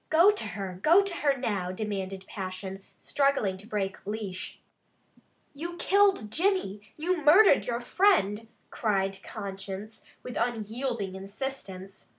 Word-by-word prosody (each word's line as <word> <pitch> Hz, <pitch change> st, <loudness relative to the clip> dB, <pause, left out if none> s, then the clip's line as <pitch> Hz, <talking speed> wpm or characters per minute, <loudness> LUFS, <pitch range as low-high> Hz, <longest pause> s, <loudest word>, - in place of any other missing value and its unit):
"Go 340 Hz, +6 st, +7 dB
to 415 Hz, -, -4 dB
her! 190 Hz, -3 st, -5 dB
Go 345 Hz, -, +6 dB
to 395 Hz, -2 st, -3 dB
her 280 Hz, -2 st, +2 dB
now!" 200 Hz, -8 st, -1 dB
demanded 195 Hz, -1 st, -4 dB
passion, 190 Hz, 0 st, -6 dB, 0.2 s
struggling 275 Hz, -9 st, +1 dB
to 200 Hz, +3 st, -12 dB
break 195 Hz, -4 st, -3 dB
leash. 205 Hz, -3 st, -5 dB, 0.9 s
"You 340 Hz, +4 st, -6 dB
killed 390 Hz, -, +3 dB
Jimmy! 335 Hz, -, +1 dB, 0.2 s
You 335 Hz, +1 st, -1 dB
murdered 320 Hz, +1 st, +7 dB
your 235 Hz, -1 st, -1 dB
friend!" 240 Hz, -, +2 dB, 0.2 s
cried 195 Hz, -3 st, 0 dB
conscience, 200 Hz, +1 st, -7 dB, 0.2 s
with 250 Hz, -, -6 dB
unyielding 230 Hz, -2 st, -2 dB
insistence. 195 Hz, -1 st, -6 dB
215 Hz, 125 wpm, -28 LUFS, 195-290 Hz, 0.9 s, Go